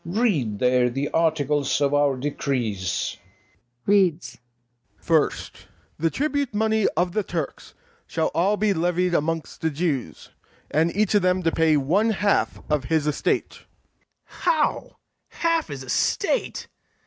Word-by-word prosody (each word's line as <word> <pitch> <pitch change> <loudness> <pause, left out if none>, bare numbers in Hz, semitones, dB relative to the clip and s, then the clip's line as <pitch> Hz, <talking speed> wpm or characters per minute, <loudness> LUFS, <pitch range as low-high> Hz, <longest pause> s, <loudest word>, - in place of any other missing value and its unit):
Read 170 - 0
there 125 +1 +3
the 135 +4 -2
articles 150 -4 +1
of 140 -1 +1
our 145 -2 +2
decrees. 115 -10 -2
OFFICER. 120 +6 -36
[reads] 175 -11 +2 0.6
FIRST, 160 +6 -1 0.3
THE 165 +1 +2
TRIBUTE 285 - -1
MONEY 220 0 +2
OF 175 0 +1
THE 215 - 0
TURKS 170 -6 -5 0.3
SHALL 160 -1 -1
ALL 195 +5 +2
BE 210 -1 +2
LEVIED 180 +1 0
AMONGST 165 0 -2
THE 160 - +1
JEWS, 140 - -3 0.4
AND 160 +3 +2
EACH 215 -1 +2
OF 205 - +4
THEM 185 0 +1
TO 165 - +2
PAY 160 -2 +3
ONE 180 +11 +2
HALF 200 0 0
OF 150 -4 0
HIS 155 +1 +1
ESTATE. 150 -1 0
BARABAS. - - -24 0.6
How! - - -1 0.3
half 330 -1 0
his 135 -2 -7
estate! 125 - -1
160 Hz, 135 wpm, -24 LUFS, 140-190 Hz, 0.6 s, OF